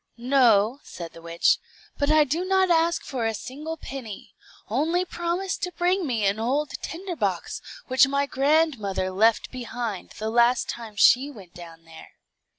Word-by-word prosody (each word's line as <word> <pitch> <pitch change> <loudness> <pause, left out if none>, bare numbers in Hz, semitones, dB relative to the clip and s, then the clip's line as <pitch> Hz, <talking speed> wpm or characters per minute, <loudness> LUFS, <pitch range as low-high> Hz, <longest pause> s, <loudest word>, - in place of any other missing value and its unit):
"No," 240 -2 +3
said 170 -2 -9
the 165 - -12
witch; 170 0 +2 0.4
"but 285 0 +1
I 310 0 +6
do 305 +5 -1
not 380 -1 +2
ask 335 +1 +2
for 245 -5 -2
a 225 - -2
single 300 +9 -6
penny. 225 -9 -8 0.3
Only 320 - 0
promise 350 +2 -2
to 360 - -3
bring 360 0 0
me 225 -5 0
an 200 +2 +1
old 275 +6 0
tinder 355 +2 -5
box, 195 - -2 0.2
which 260 +1 +4
my 280 +1 0
grandmother 270 -10 +1
left 220 +4 +2
behind 240 -5 -5
the 220 +1 -3
last 240 +1 +3
time 225 -3 -7
she 255 +7 +5
went 195 -10 -13
down 165 -1 -12
there." 165 0 -14
255 Hz, 160 wpm, -25 LUFS, 210-315 Hz, 0.4 s, I